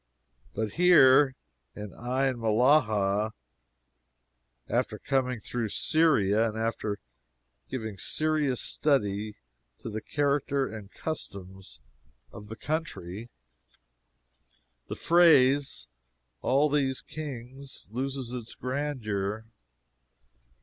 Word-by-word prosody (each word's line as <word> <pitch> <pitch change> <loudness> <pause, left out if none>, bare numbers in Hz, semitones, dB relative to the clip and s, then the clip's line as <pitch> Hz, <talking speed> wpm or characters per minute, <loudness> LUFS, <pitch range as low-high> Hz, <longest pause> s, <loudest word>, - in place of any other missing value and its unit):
But 110 0 -2
here 140 -6 +7 0.4
in 105 -2 -7
Ain 130 +1 -1
Mellahah, 110 -3 +2 1.3
after - - -1
coming 130 -3 -1
through 115 +1 -3
Syria, 115 -9 +3
and 110 - -7
after 110 -2 -2 0.7
giving 110 -6 -5
serious 155 -5 0
study 105 -7 0 0.4
to 115 - -7
the 110 +1 -4
character 140 -1 0
and 105 -3 -9
customs 95 - -7 0.5
of 105 - -11
the 110 - -7
country, 120 - -4 1.6
the - - -5
phrase 145 -5 +4 0.6
"all 140 +3 +3
these 135 -3 0
kings" 135 -2 -7
loses 130 0 -3
its 120 -3 -5
grandeur. 115 -6 -3
125 Hz, 85 wpm, -28 LUFS, 110-140 Hz, 1.6 s, here